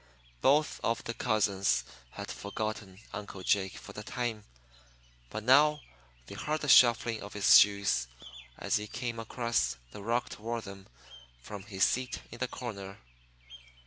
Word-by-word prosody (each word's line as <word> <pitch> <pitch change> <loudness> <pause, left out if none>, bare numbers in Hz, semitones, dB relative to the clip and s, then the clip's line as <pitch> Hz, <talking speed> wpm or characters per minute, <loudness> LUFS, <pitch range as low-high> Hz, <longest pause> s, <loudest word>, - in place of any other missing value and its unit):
Both 150 +3 +3
of 115 - 0
the 115 - -4
cousins 100 -4 +1 0.3
had - - -6
forgotten 100 -1 -5
Uncle 100 -2 -7
Jake 95 0 +1
for - - -11
the 105 - -7
time. 115 -1 -4 0.8
But 110 - -5
now 150 +5 +5 0.4
they - - -10
heard 155 +1 -2
the 145 - -3
shuffling 120 -3 +5
of 100 - -9
his 105 -1 +8
shoes 100 -12 +2 0.5
as - - 0
he 105 0 -5
came 120 0 -4
across 115 - -1
the 100 - -9
rug 115 +4 0
toward 115 +1 -5
them 100 -1 -10 0.6
from 100 +7 -7
his 95 -2 -1
seat 130 0 +1
in 120 - -10
the 125 - 0
corner. 100 -6 -7
110 Hz, 145 wpm, -30 LUFS, 100-120 Hz, 0.8 s, his